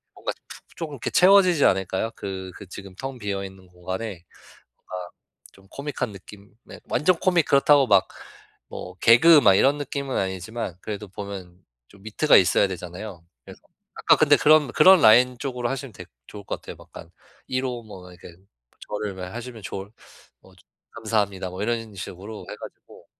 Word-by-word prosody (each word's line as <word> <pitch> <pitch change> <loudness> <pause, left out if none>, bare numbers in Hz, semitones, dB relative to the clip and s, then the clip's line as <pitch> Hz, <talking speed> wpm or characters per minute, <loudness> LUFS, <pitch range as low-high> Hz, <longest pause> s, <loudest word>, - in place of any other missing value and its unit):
뭔가 - - -4 0.2
푹 - - -15
쪼금 160 -3 -6
이렇게 125 - -4
채워지지 185 -4 +5
않을까요? 95 +3 0
그 95 -2 -6
그 100 - -11
지금 95 0 -10
텅 135 +5 -7
비어 100 -2 -3
있는 95 -1 -13
공간에 90 +2 -7 0.5
뭔가 90 -1 -8 0.4
좀 95 0 -21
코믹한 140 -4 -4
느낌 100 +1 -14
네 - - -12
완전 170 +7 +2
코믹 175 -4 +2
그렇다고 140 0 +4
막 100 -2 +4 0.6
뭐 90 - -8
개그 125 - +6
막 100 -7 +5
이런 135 +9 +3
느낌은 140 -1 -4
아니지만 95 +2 -4
그래도 105 -1 -6
보면 95 -2 -9 0.3
좀 100 -1 -20
위트가 110 +8 +3
있어야 95 - +4
되잖아요. 90 0 -8 0.2
그래서 - - -14 0.3
아까 - - +4
근데 - - +5
그런 155 -2 +4
그런 190 -1 +7
라인 125 +3 +6
쪽으로 125 -3 -3
하시면 135 -3 -5
되게 - - -12 0.2
좋을 105 - -10
것 - - -5
같아요. - - -9
막 - - -17
약간 80 - -12 0.4
1 130 +1 -2
호 125 -2 -4
뭐 95 -4 -12
이렇게 90 -1 -14 0.5
저를 105 -1 -4
뭐 95 -1 -7
하시면 115 +3 -9
좋을 95 0 -7 0.5
뭐 95 - -20 0.4
감사합니다 105 -5 -2
뭐 90 +2 -6
이런 115 -1 -3
식으로 100 +3 -8
해 - - -7
가지고 - - -14
105 Hz, 345 characters per minute, -24 LUFS, 95-130 Hz, 0.6 s, 그런